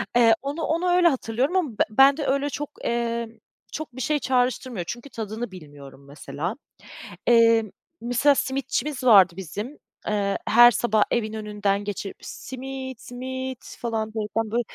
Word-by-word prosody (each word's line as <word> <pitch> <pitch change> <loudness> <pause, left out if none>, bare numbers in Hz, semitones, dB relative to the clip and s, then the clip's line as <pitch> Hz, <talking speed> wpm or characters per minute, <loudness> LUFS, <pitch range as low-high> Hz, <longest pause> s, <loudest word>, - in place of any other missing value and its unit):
eee, 230 -2 +6
onu 285 +4 -4
onu 335 +4 0
öyle 355 0 +5
hatırlıyorum 265 +3 0
ama. 360 -6 +1
Be - - +6
bende 275 +6 +5
öyle 280 +2 +1
çok, 295 +1 -5
eee, 235 0 -1 0.4
çok 310 -6 -7
bir 260 - -5
şey 300 +2 +1
çağrıştırmıyor, 250 -6 -1
çünkü 240 +7 -6
tadını 220 -1 -5
bilmiyorum 145 -5 -13
mesela. 155 - -5 0.7
Eee, 230 -1 +5 0.4
mesela 245 +5 +3
simitçimiz 270 +1 -2
vardı 195 -7 +7
bizim, 205 - -6 0.3
eee, 200 -2 0
her 240 +2 +8
sabah 220 -2 +2
evin 220 -2 -1
önünden 205 -2 -2
geçip, 200 -1 -5
"Simit, 260 -1 -7
simit!" 260 +1 -7
falan 225 -2 -2
derken 220 0 -2
böyle 240 +1 +1
240 Hz, 140 wpm, -24 LUFS, 215-265 Hz, 0.7 s, her